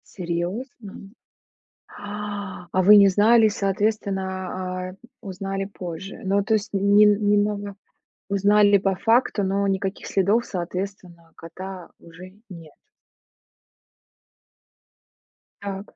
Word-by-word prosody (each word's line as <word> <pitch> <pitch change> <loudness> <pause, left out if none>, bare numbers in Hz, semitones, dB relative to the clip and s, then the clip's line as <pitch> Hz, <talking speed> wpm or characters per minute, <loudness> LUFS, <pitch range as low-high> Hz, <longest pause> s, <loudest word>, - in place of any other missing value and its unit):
Серьёзно? 190 +5 -5 0.9
А! 205 -2 -7
А 185 - +4
вы 210 +1 +9
не 200 -1 +7
знали 225 +2 +5
и, - - +4
соответственно, 195 -1 -1 0.2
а, 185 0 -5 0.3
узнали 195 0 -5
позже. 185 -1 -8
Ну, 200 +1 +1
то 210 - 0
есть 210 0 -3
не 200 +2 +5
н 210 - +6 0.2
немного 205 -1 0 0.5
узнали 205 +1 +4
по 195 0 0
факту, 225 +1 +1
но 195 +1 0
никаких 195 0 -2
следов, 205 +5 +1
соответственно, 180 -2 -6
кота 185 +2 -9
уже 170 +2 -13 0.2
нет. 165 -4 -12 2.9
Так. 200 0 -7
195 Hz, 105 wpm, -23 LUFS, 185-205 Hz, 2.9 s, вы